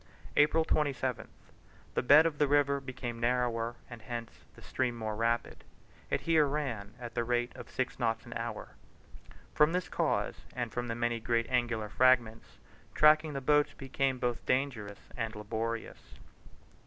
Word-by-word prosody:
April 155 +2 +4
27th. 130 -8 -1 0.7
The - - +1
bed 145 +5 +7
of 155 -3 -1
the 150 - +4
river 140 0 +3
became 130 -3 -6
rather - - -10
narrower 120 -2 0
and 120 -2 -10
hence 115 +1 -6 0.2
the - - -15
stream 125 -2 -1
more 110 -1 -3
rapid. 115 +2 -1 0.5
It - - 0
here 160 -3 +3
ran 120 -8 -3
at 120 -1 -7
the 120 - 0
rate 120 +1 -1
of - - -10
six 130 0 -3
knots 115 -2 0
an 120 - -8
hour. 115 -2 -5 0.8
From 150 +2 +4
this 180 0 -1
cause, - - 0 0.2
and 120 -3 -3
from 120 0 -3
the 115 - -2
many 120 0 -1
great 115 +1 0
angular 120 -4 0
fragments, 120 -1 +2 0.4
tracking 155 0 +5
the 135 - -3
boats 150 +2 +3
became 135 -1 -1
both 120 -1 -2
dangerous 120 -7 -1
and 115 -3 -3
laborious. 110 +2 -4
120 Hz, 160 wpm, -31 LUFS, 115-140 Hz, 0.8 s, bed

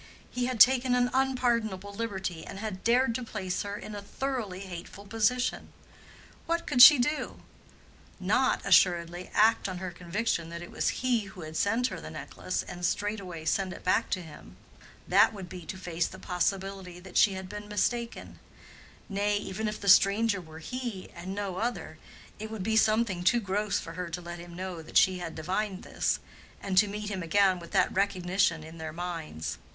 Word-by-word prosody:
He 250 0 -1
had 255 -3 -3
taken 255 0 +6
an 245 0 +2
unpardonable 235 -7 0
liberty, 190 -6 -4
and - - -8
had 205 -2 -5
dared 245 +1 +3
to 250 +2 -3
place 185 -5 -3
her 205 0 -4
in 215 - -8
a 205 - -5
thoroughly 215 -4 -4
hateful 190 +1 -9
position. 225 +4 0 0.8
What 335 0 0
could 245 - +3
she 295 +3 +12
do?—Not, 295 +5 -2
assuredly, 175 0 +3
act 220 -1 +4
on 185 - -4
her 185 0 -5
conviction 175 0 -2
that 170 +1 -6
it 175 - -10
was - - 0 0.2
he 240 -4 +2
who 190 -2 -11
had 155 0 -8
sent 225 +8 +1
her - - -7
the - - -8
necklace - - -4
and 175 0 -9
straightway 185 -3 -2
send 185 +3 0
it - - -11
back 185 - +2
to 185 - -2
him: 160 -2 -13 0.5
that - - +5
would 195 -3 -7
be 175 -1 -9
to 190 - -5
face 175 -2 -2
the 190 - -10
possibility 190 0 -2
that 185 0 -13
she 200 - +5
had 190 0 -6
been 205 +2 -8
mistaken; 230 +3 -2 0.7
nay, 205 +1 0
even 205 +2 -3
if 210 0 -4
the 200 - -6
"stranger" 200 +1 +5
were 160 -2 -12
he 230 +2 -6
and 180 +3 -6
no 200 -3 -3
other, 235 +4 -3 0.4
it 215 +1 -5
would 220 -4 -5
be 220 +2 0
something 215 -4 +2
too 240 +6 +4
gross 205 -1 -1
for 165 - -8
her 180 0 -4
to 170 +2 -4
let 175 0 -8
him 170 0 -10
know 185 -2 -5
that 160 - -1
she 185 -1 +5
had 165 -2 -6
divined 190 +4 -2
this, - - -1 0.4
and 195 - -3
to 210 - +4
meet 210 +1 -5
him 190 -2 -3
again 185 +2 +3
with 170 - -11
that - - +2
recognition 185 -4 +1
in 160 +1 -11
their 160 -1 -5
minds. 155 - -5
195 Hz, 190 wpm, -29 LUFS, 180-220 Hz, 0.8 s, she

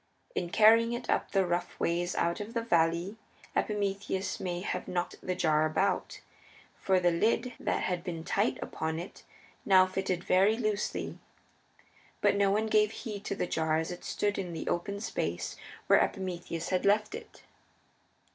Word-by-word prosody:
In 175 - -2
carrying 225 +4 +5
it 240 - -3
up - - 0
the 195 -2 +2
rough 175 0 -2
ways 175 +1 0
out 170 0 0
of 215 +3 -7
the 230 - 0
valley 170 0 +1 0.4
Epimetheus 200 -2 -1
may 175 -1 -3
have 180 -1 -3
knocked 175 -1 -2
the 185 - -2
jar 155 -4 +2
about, 195 +6 -1 0.6
for 190 -1 +2
the 175 -1 +3
lid 225 +8 +1
that - - -1
had 180 -2 -1
been 170 -3 -5
tight 200 +6 +1
upon 160 0 -3
it 175 +3 -8 0.4
now 185 -1 +6
fitted 185 -1 -2
very 195 +4 +4
loosely. 215 -3 -2 1.0
But - - +3
no 200 -1 +3
one 210 +3 +2
gave 215 -1 +3
heed 215 -3 -6
to - - -2
the - - -1
jar 160 -2 0
as 160 +1 -2
it 175 - -8
stood 205 -1 -1
in 180 -3 -4
the 160 - -5
open 200 +4 -2
space 85 - -3 0.3
where - - +6
Epimetheus 175 -3 -4
had 185 -1 +1
left 210 +1 +2
it. - - -10
185 Hz, 165 wpm, -30 LUFS, 175-205 Hz, 1.0 s, now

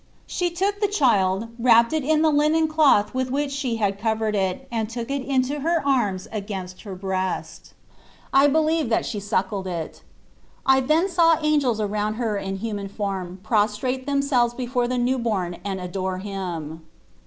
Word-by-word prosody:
She 355 -2 -1
took 395 +4 -1
the 410 - +3
child, 225 - +2
wrapped 235 +1 +5
it 310 -2 0
in 310 +2 +2
the 315 - +4
linen 305 +2 +3
cloth 305 -9 +3
with 260 0 -1
which 280 +2 -1
she 275 -4 -2
had 200 -3 -1
covered 220 0 0
it, 195 +6 -1
and 225 -2 -2
took 235 +2 -5
it 280 0 -1
in 265 -1 +1
her 295 +4 0
arms 205 -9 +1
against 195 -3 -6
her 200 -4 -7
breast. 190 0 -4 0.6
I 275 +1 +6
be 290 +2 +2
lieve 315 -3 +1
that 225 - +1
she 210 - -3
suckled 195 -1 -2
it. 170 -3 -5 0.6
I 265 0 +5
then 305 +7 +2
saw 335 -3 +4
angels 285 -7 +2
around 210 0 -1
her 225 -3 -1
in 195 -1 -3
human 205 -1 -4
form 190 -3 -4
pros 210 -1 +1
trate 260 +3 -3
themselves 275 -4 +1
before 245 -1 -1
the 250 +1 -1
new 250 +2 +1
born 190 -7 -2
and 195 -1 -3
adore 185 +1 -3
Him. 175 -5 -5
230 Hz, 175 wpm, -23 LUFS, 195-280 Hz, 0.6 s, I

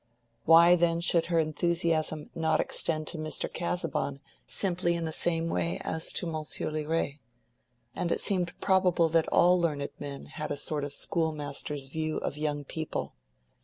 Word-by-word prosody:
Why 170 +2 +8
then 170 -1 +2
should 170 -1 +2
her 170 -1 +1
enthusiasm 160 -1 0
not 160 -1 +1
extend 155 -2 -1
to 165 - -6
Mr. 155 0 -3
Casaubon 165 -5 -2 0.3
simply 175 -2 +1
in 170 -1 -2
the 160 - -2
same 165 0 0
way 90 - -1
as 160 0 -2
to - - -2
Monsieur 155 -2 -3
Liret? 155 -1 -1 0.8
And 170 - -1
it - - +1
seemed 180 -3 0
probable 180 -3 +3
that 165 0 +2
all 180 0 +4
learned 145 -4 -1
men 140 -1 -7
had 155 - -6
a - - -2
sort 150 0 +1
of 145 - -4
schoolmaster's 150 -3 -1
view 155 +2 -2
of - - -3
young 150 -1 -2
people. 160 +3 -4
160 Hz, 160 wpm, -29 LUFS, 150-170 Hz, 0.8 s, Why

